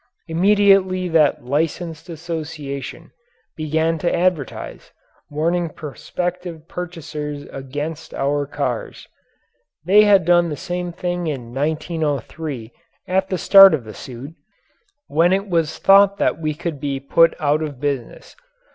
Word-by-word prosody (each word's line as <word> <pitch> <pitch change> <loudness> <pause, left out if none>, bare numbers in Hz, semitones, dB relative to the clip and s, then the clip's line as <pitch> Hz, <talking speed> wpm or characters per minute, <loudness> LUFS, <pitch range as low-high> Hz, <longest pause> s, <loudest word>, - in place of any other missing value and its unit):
Immediately 190 +1 +3
that 155 -6 +2
Licensed 160 +4 -2
Association 155 -4 -6 0.4
began 160 +1 0
to 170 - 0
advertise, 175 -7 -2 0.4
warning 165 +3 0
prospective 170 +3 -6
purchasers 155 -5 -6
against 145 +4 -6
our 145 +1 -1
cars. - - -4 0.8
They 205 +4 +6
had 200 -4 +5
done 175 0 +4
the 150 - -4
same 180 -1 -4
thing 175 0 -3
in 125 -6 -5
1903 150 -3 -3 0.4
at 190 +1 0
the 185 - -1
start 195 -1 +8
of 135 - -7
the 110 -1 -10
suit, 130 +7 -9 0.7
when 165 +4 +2
it 195 +2 0
was 165 -4 0
thought 200 0 +5
that 165 - 0
we 155 -1 -2
could 165 -2 -5
be 140 -1 -3
put 165 +4 +3
out 150 +1 +1
of 145 -5 -5
business. 140 -4 -4
160 Hz, 125 wpm, -20 LUFS, 145-180 Hz, 0.8 s, start